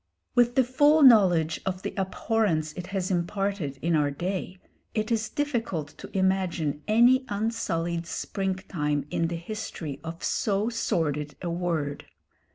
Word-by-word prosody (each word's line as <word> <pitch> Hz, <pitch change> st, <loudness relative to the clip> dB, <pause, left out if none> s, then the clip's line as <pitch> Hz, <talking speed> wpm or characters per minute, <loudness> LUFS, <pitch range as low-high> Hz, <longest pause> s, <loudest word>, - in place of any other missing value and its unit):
With 245 Hz, 0 st, +3 dB
the 260 Hz, -, +5 dB
full 290 Hz, +5 st, +4 dB
knowledge 180 Hz, -, +6 dB
of 185 Hz, -1 st, -3 dB
the -, -, -3 dB
abhorrence 190 Hz, -5 st, 0 dB
it 180 Hz, +1 st, -7 dB
has 190 Hz, -1 st, -2 dB
imparted 180 Hz, -4 st, -1 dB
in 170 Hz, 0 st, +2 dB
our 145 Hz, -2 st, +2 dB
day, 180 Hz, +5 st, -4 dB, 0.4 s
it 215 Hz, +1 st, -1 dB
is 220 Hz, -1 st, 0 dB
difficult 225 Hz, -, -2 dB
to -, -, -9 dB
imagine 185 Hz, -6 st, 0 dB
any 240 Hz, +4 st, +5 dB
unsullied 175 Hz, -6 st, -2 dB
spring 190 Hz, +2 st, -2 dB
time 150 Hz, -6 st, -2 dB
in 165 Hz, -, +1 dB
the 170 Hz, -, -3 dB
history 165 Hz, -5 st, -6 dB
of 165 Hz, +1 st, -7 dB
so 205 Hz, +1 st, 0 dB
sordid 150 Hz, -10 st, -1 dB
a 170 Hz, -, -2 dB
word. 165 Hz, -5 st, -2 dB
185 Hz, 145 wpm, -27 LUFS, 165-215 Hz, 0.4 s, knowledge